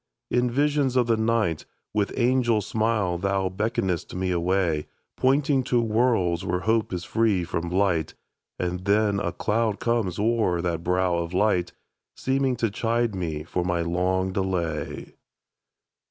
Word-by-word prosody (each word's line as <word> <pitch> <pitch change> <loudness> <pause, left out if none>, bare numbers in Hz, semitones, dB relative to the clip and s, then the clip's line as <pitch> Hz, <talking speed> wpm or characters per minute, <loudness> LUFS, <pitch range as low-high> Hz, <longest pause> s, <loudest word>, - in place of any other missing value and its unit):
In 125 0 +2
visions 140 0 +1
of 125 -2 +4
the 115 -1 +2
night 110 -7 0 0.3
With 105 -1 0
angel 120 -3 +2
smile 110 -6 0
thou 95 0 0
beckon'st 95 -4 -2
me 95 0 -1
away, 85 -3 0 0.3
Pointing 135 +1 +2
to 120 - +2
worlds 110 -7 +1
where 90 -1 -1
hope 110 +1 +1
is 90 -2 -3
free 105 -3 +1
from 85 0 -3
blight; 90 -4 0 0.4
And 90 +1 -3
then 100 0 +2
a - - -1
cloud 110 -1 0
comes 115 -7 0
o'er 110 -5 +1
that 85 -1 -2
brow 90 0 +1
of 85 +1 -4
light, 95 -3 +1 0.4
Seeming 135 -1 0
to 115 -3 -1
chide 115 +1 0
me 80 -5 -3
for 90 +2 -2
my 90 -1 0
long 90 +2 0
delay. 85 -6 -3
100 Hz, 145 wpm, -25 LUFS, 90-115 Hz, 0.4 s, of